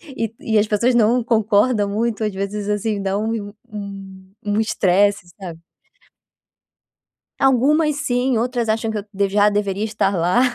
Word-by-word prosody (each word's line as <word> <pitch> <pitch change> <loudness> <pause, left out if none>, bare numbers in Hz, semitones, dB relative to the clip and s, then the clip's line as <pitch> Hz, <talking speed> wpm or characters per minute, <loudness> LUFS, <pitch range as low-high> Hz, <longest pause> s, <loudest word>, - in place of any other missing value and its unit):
e 225 -3 -3
e 220 -1 0
as 210 - +1
pessoas 235 +4 +1
não 240 +2 +3
concordam 220 -1 +2
muito, 220 +2 -1
às 210 -2 -1
vezes 200 +1 -4
assim 210 0 -1
dá 195 0 -1
um 215 -1 -3 0.2
um 195 -2 -9
um 205 +1 0
estresse, 200 -3 +2
sabe 170 -4 -7 1.8
Algumas 285 +4 +3
sim, 255 -3 0
outras 240 0 -1
acham 220 +1 0
que 220 - -3
eu 200 - -9
de 200 0 +1
já 205 +1 +4
deveria 205 -1 -1
estar 210 -2 0
lá. 180 +7 +2
210 Hz, 155 wpm, -20 LUFS, 200-230 Hz, 1.8 s, já